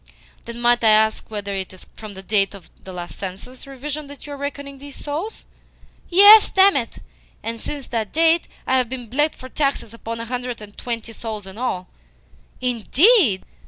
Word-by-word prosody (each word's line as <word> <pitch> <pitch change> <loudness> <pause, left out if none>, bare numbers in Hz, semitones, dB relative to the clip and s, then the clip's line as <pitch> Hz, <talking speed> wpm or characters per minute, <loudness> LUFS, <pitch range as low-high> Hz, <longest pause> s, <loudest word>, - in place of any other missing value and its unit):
"Then 235 0 -7
might 240 0 +3
I 215 -1 +7
also 220 0 -1
ask - - -22
whether 205 -2 -4
it 190 -1 -4
is 185 - -11
from 215 -2 -10
the 190 - -8
date 200 0 +1
of 195 - -14
the 190 - -9
last 175 -1 -7
census 195 +8 -7
revision 285 +2 -5
that 285 0 -11
you 290 - -7
are - - -7
reckoning 280 -1 -6
these 285 0 -10
souls?" 315 +10 -5 0.6
"Yes, 405 +4 +9
damn 385 +1 +6
it! 235 -4 -2 0.5
And 230 0 -4
since 285 +1 -5
that 225 -3 -3
date 330 +1 +3 0.2
I 260 - +2
have 250 -3 +1
been 255 -1 -5
bled 295 +7 0
for 255 - -10
taxes 275 -5 -1
upon 230 0 -6
a 230 - -4
hundred 245 0 -4
and 210 -1 -11
twenty 230 -1 -5
souls 220 -3 -6
in 195 +3 -10
all." 185 -8 -2 0.7
"Indeed? 250 - +4
245 Hz, 195 wpm, -21 LUFS, 215-285 Hz, 0.7 s, Yes